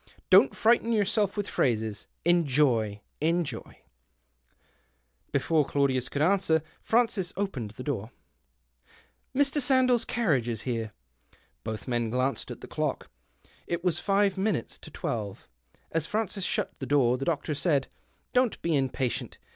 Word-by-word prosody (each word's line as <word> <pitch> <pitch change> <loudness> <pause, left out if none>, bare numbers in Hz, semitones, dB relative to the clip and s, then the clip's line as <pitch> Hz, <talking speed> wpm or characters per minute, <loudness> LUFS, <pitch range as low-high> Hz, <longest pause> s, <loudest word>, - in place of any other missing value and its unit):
Don't - - +7
frighten 230 0 +3
yourself 210 -1 +1
with 205 0 -1
phrases. 110 -4 -1 0.2
Enjoy! 135 -11 +2 0.2
Enjoy! 165 0 -1 0.8
" 60 0 -41
Before 160 -2 +2
Claudius 135 -3 0
could 145 - 0
answer, 165 -4 +3 0.2
Francis 220 -6 +1
opened 170 - -2
the 125 - -6
door: 115 -7 -3 0.4
— - - -48 0.2
" 260 - -16
Mr. 285 +1 +3
Sandell's 255 -2 +4
carriage 155 - +1
is 115 -3 -2
here." 115 -4 -2 0.7
Both 110 +2 -5
men 120 -2 0
glanced 130 +3 -1
at - - -8
the - - -8
clock; - - -3 0.6
it 170 0 -2
was 180 -3 +1
five 195 -1 +2
minutes 195 - -1
to - - -11
twelve. 105 -4 -4 0.4
As 165 -1 -1
Francis 210 -2 -2
shut - - -1
the 135 - -5
door, 130 -4 +3
the 135 - -3
doctor 155 -2 -1
said 145 -2 +1
— - - -39
" - - -45
Don't 250 -2 +2
be 165 -2 +1
impatient. 130 -2 -1
150 Hz, 145 wpm, -28 LUFS, 120-195 Hz, 0.8 s, Don't